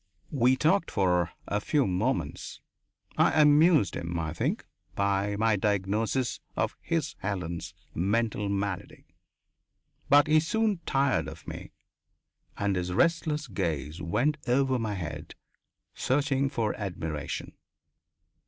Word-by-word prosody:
We 130 Hz, -2 st, +3 dB
talked 165 Hz, +7 st, +2 dB
for 90 Hz, -3 st, +2 dB, 0.2 s
a 105 Hz, +1 st, -1 dB
few 145 Hz, +4 st, +2 dB
moments. 105 Hz, +9 st, -2 dB, 0.6 s
I -, -, +4 dB
amused 150 Hz, -, +5 dB
him, 85 Hz, 0 st, -3 dB
I 80 Hz, -2 st, -2 dB
think, 85 Hz, -, -2 dB, 0.3 s
by 100 Hz, 0 st, +1 dB
my 110 Hz, +1 st, +2 dB
diagnosis 105 Hz, +5 st, 0 dB, 0.2 s
of -, -, -1 dB
his 165 Hz, -3 st, -1 dB
Helen's 90 Hz, -3 st, -4 dB, 0.2 s
mental 105 Hz, +3 st, 0 dB
malady. 100 Hz, -2 st, -3 dB, 1.0 s
But 145 Hz, +1 st, +7 dB
he 155 Hz, +1 st, +5 dB
soon 210 Hz, +4 st, 0 dB
tired 135 Hz, -, +2 dB
of 80 Hz, 0 st, -10 dB
me -, -, -7 dB, 0.9 s
and 100 Hz, -1 st, 0 dB
his 90 Hz, 0 st, -2 dB
restless 155 Hz, -, +1 dB
gaze 80 Hz, -, -3 dB
went 135 Hz, -, +1 dB
over 130 Hz, +1 st, +2 dB
my 110 Hz, -3 st, -2 dB
head, 85 Hz, -5 st, -6 dB, 0.6 s
searching 140 Hz, 0 st, +1 dB
for 115 Hz, -6 st, -1 dB
admiration. 80 Hz, -7 st, -4 dB
105 Hz, 115 wpm, -28 LUFS, 90-140 Hz, 1.0 s, But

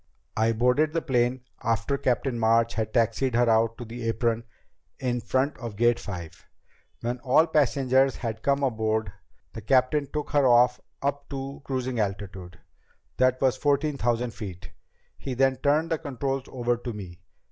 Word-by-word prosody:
"I 110 Hz, +1 st, +2 dB
boarded 125 Hz, +7 st, +2 dB
the 165 Hz, -, 0 dB
plane 125 Hz, -2 st, +1 dB, 0.2 s
after 115 Hz, +3 st, 0 dB
Captain 125 Hz, -1 st, 0 dB
March 115 Hz, +1 st, +3 dB
had 110 Hz, -1 st, -2 dB
taxied 115 Hz, +2 st, +1 dB
her 120 Hz, 0 st, +3 dB
out 115 Hz, 0 st, +3 dB
to 120 Hz, -, -7 dB
the 115 Hz, +1 st, -6 dB
apron 115 Hz, 0 st, 0 dB, 0.5 s
in 125 Hz, -2 st, -1 dB
front 130 Hz, +5 st, 0 dB
of 115 Hz, -4 st, -6 dB
Gate 120 Hz, +2 st, +3 dB
Five. 85 Hz, -5 st, -8 dB, 0.5 s
When 120 Hz, +1 st, -2 dB
all 130 Hz, +6 st, +4 dB
passengers 135 Hz, -3 st, +2 dB
had 110 Hz, -2 st, -4 dB
come 140 Hz, +2 st, +1 dB
aboard, 110 Hz, -4 st, 0 dB, 0.4 s
the 110 Hz, -, -7 dB
captain 130 Hz, +5 st, +2 dB
took 150 Hz, -1 st, -4 dB
her 145 Hz, -2 st, +4 dB
off 125 Hz, 0 st, +5 dB
and 140 Hz, -, -3 dB
up 140 Hz, 0 st, -27 dB
to 135 Hz, 0 st, -6 dB
cruising 130 Hz, -2 st, -2 dB
altitude. 95 Hz, -3 st, -4 dB, 0.6 s
That 130 Hz, 0 st, +3 dB
was 130 Hz, -1 st, +2 dB
fourteen 145 Hz, +1 st, +1 dB
thousand 120 Hz, 0 st, 0 dB
feet. 95 Hz, -4 st, -8 dB, 0.5 s
He 130 Hz, -2 st, -4 dB
then 135 Hz, +1 st, +2 dB
turned 150 Hz, +5 st, +1 dB
the 160 Hz, -, +1 dB
controls 135 Hz, -2 st, -3 dB
over 120 Hz, -1 st, -1 dB
to 120 Hz, 0 st, -6 dB
me. 90 Hz, -5 st, -9 dB
125 Hz, 165 wpm, -26 LUFS, 115-135 Hz, 0.6 s, off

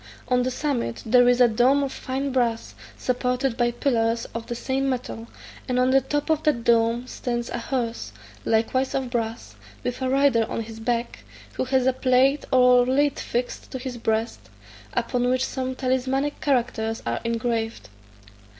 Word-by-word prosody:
On 250 Hz, 0 st, +3 dB
the 250 Hz, -, 0 dB
summit 255 Hz, -, -2 dB
there 245 Hz, +2 st, +5 dB
is 245 Hz, 0 st, +3 dB
a 245 Hz, -, +7 dB
dome 250 Hz, +5 st, +3 dB
of 275 Hz, -, -2 dB
fine 270 Hz, +2 st, -3 dB
brass, 235 Hz, -3 st, 0 dB, 0.2 s
supported 250 Hz, 0 st, -1 dB
by 240 Hz, -1 st, +2 dB
pillars 235 Hz, -2 st, 0 dB
of 230 Hz, 0 st, -5 dB
the 240 Hz, -, -4 dB
same 270 Hz, +3 st, -1 dB
metal, 245 Hz, -3 st, -4 dB, 0.4 s
and 250 Hz, -, +1 dB
on 255 Hz, +1 st, +3 dB
the 270 Hz, 0 st, +5 dB
top 290 Hz, +4 st, -1 dB
of 315 Hz, -1 st, +2 dB
that 285 Hz, -7 st, +1 dB
dome 230 Hz, +1 st, +2 dB
stands 240 Hz, -2 st, -4 dB
a -, -, -3 dB
horse, 235 Hz, -1 st, -3 dB, 0.3 s
likewise 245 Hz, +4 st, +1 dB
of 260 Hz, -2 st, -2 dB
brass, 225 Hz, -, -3 dB, 0.3 s
with 245 Hz, +1 st, -3 dB
a 260 Hz, -, 0 dB
rider 270 Hz, -3 st, +3 dB
on -, -, -2 dB
his 225 Hz, 0 st, -9 dB
back, 235 Hz, -, -2 dB, 0.3 s
who -, -, -2 dB
has 260 Hz, 0 st, +1 dB
a 260 Hz, -, +3 dB
plate 260 Hz, +2 st, +2 dB
or 250 Hz, -1 st, +6 dB
lead 275 Hz, +3 st, +1 dB
fixed 245 Hz, +1 st, -3 dB
to 260 Hz, -, -5 dB
his 255 Hz, -1 st, -6 dB
breast, 225 Hz, +1 st, -2 dB, 0.5 s
upon 245 Hz, -1 st, 0 dB
which 255 Hz, +1 st, +1 dB
some 260 Hz, -1 st, -3 dB
talismanic 260 Hz, +2 st, -1 dB
characters 235 Hz, -5 st, 0 dB
are 115 Hz, 0 st, -1 dB
engraver. 230 Hz, -1 st, -1 dB
250 Hz, 170 wpm, -24 LUFS, 230-260 Hz, 0.5 s, a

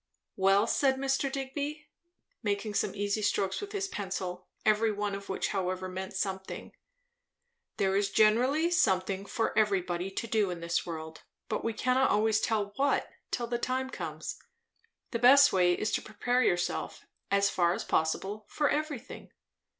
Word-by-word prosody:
"Well," 195 Hz, +2 st, +4 dB
said 265 Hz, +3 st, +2 dB
Mr. 270 Hz, 0 st, 0 dB
Digby, 285 Hz, +3 st, -4 dB, 0.6 s
making 205 Hz, -1 st, -2 dB
some 205 Hz, -, 0 dB
easy 205 Hz, +1 st, -1 dB
strokes 195 Hz, -2 st, 0 dB
with 410 Hz, 0 st, -6 dB
his 400 Hz, -2 st, -2 dB
pencil, 185 Hz, -, -5 dB, 0.2 s
every 215 Hz, +1 st, +3 dB
one 205 Hz, -1 st, -2 dB
of 200 Hz, 0 st, -7 dB
which 190 Hz, -, -1 dB
however 185 Hz, -2 st, -2 dB
meant 190 Hz, +2 st, -6 dB
something, 190 Hz, 0 st, -4 dB, 1.0 s
"there 195 Hz, -1 st, +1 dB
is 200 Hz, 0 st, +2 dB
generally 250 Hz, -, +3 dB
something 190 Hz, -, +1 dB
for 225 Hz, -, -1 dB
everybody 190 Hz, -4 st, +1 dB
to 195 Hz, -, -4 dB
do 215 Hz, -3 st, +1 dB
in 175 Hz, -1 st, -4 dB
this 170 Hz, +1 st, -1 dB
world; 160 Hz, -1 st, -6 dB, 0.3 s
but -, -, -2 dB
we 230 Hz, -, -1 dB
cannot 255 Hz, +4 st, +2 dB
always 215 Hz, +1 st, +2 dB
tell 210 Hz, -3 st, 0 dB
what, 280 Hz, +1 st, +1 dB, 0.2 s
till 240 Hz, -, -2 dB
the 240 Hz, 0 st, -2 dB
time 260 Hz, +1 st, -2 dB
comes. -, -, -5 dB, 0.7 s
The 235 Hz, -, -1 dB
best 275 Hz, +4 st, +7 dB
way 180 Hz, -2 st, +4 dB
is 215 Hz, -, -1 dB
to -, -, 0 dB
prepare 245 Hz, +4 st, 0 dB
yourself, 175 Hz, -7 st, -1 dB, 0.2 s
as 200 Hz, 0 st, +3 dB
far 175 Hz, -1 st, +2 dB
as -, -, -4 dB
possible, 195 Hz, +6 st, -1 dB
for 295 Hz, -1 st, +1 dB
everything." 295 Hz, -4 st, -4 dB
210 Hz, 160 wpm, -30 LUFS, 190-255 Hz, 1.0 s, best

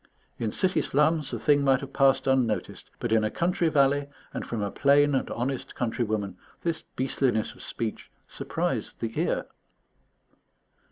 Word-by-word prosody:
In 110 Hz, -2 st, -1 dB
city 185 Hz, -, +2 dB
slums, 150 Hz, +1 st, +2 dB
the 120 Hz, -, -3 dB
thing 145 Hz, +6 st, +3 dB
might 135 Hz, -1 st, +3 dB
have 140 Hz, -1 st, -8 dB
passed 135 Hz, -1 st, +4 dB
unnoticed; 130 Hz, -5 st, 0 dB
but 120 Hz, -2 st, -3 dB
in 110 Hz, -1 st, +4 dB
a 110 Hz, -, +1 dB
country 170 Hz, +2 st, +1 dB
valley, 140 Hz, -1 st, +3 dB, 0.3 s
and -, -, -3 dB
from 110 Hz, -3 st, -3 dB
a 100 Hz, -, -2 dB
plain 145 Hz, +1 st, +4 dB
and 135 Hz, -, 0 dB
honest 125 Hz, +2 st, -3 dB
countrywoman, 110 Hz, -5 st, -2 dB, 0.3 s
this 170 Hz, -2 st, -1 dB
beastliness 130 Hz, -3 st, -1 dB
of -, -, -15 dB
speech 115 Hz, -2 st, -4 dB, 0.2 s
surprised -, -, -3 dB
the 115 Hz, -1 st, -2 dB
ear. -, -, 0 dB
135 Hz, 155 wpm, -27 LUFS, 115-145 Hz, 0.3 s, passed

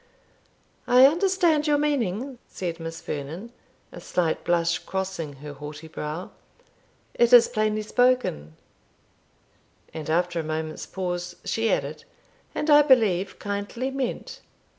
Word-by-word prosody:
"I 250 Hz, +1 st, +7 dB
understand 335 Hz, -1 st, +3 dB
your 295 Hz, -1 st, +4 dB
meaning," 265 Hz, -4 st, -1 dB
said 170 Hz, -2 st, -5 dB
Miss 165 Hz, 0 st, -7 dB
Vernon, 160 Hz, +10 st, -6 dB, 0.4 s
a -, -, -10 dB
slight 170 Hz, -3 st, -1 dB
blush 170 Hz, 0 st, +1 dB
crossing 190 Hz, -6 st, -4 dB
her 145 Hz, +2 st, -9 dB
haughty 150 Hz, +2 st, -9 dB
brow; 160 Hz, +3 st, -6 dB, 0.8 s
"it 240 Hz, -1 st, +3 dB
is 245 Hz, -2 st, +9 dB
plainly 215 Hz, -2 st, 0 dB
spoken;" 245 Hz, -, +1 dB, 1.4 s
and 155 Hz, -1 st, -6 dB
after 175 Hz, +1 st, +1 dB
a -, -, -2 dB
moment's 155 Hz, 0 st, -4 dB
pause 175 Hz, -1 st, -4 dB
she 225 Hz, 0 st, 0 dB
added, -, -, -2 dB, 0.5 s
"and 300 Hz, -, 0 dB
I 295 Hz, 0 st, +9 dB
believe 215 Hz, -, +3 dB
kindly 205 Hz, +6 st, -3 dB
meant." 265 Hz, -2 st, -4 dB
190 Hz, 120 wpm, -25 LUFS, 165-250 Hz, 1.4 s, is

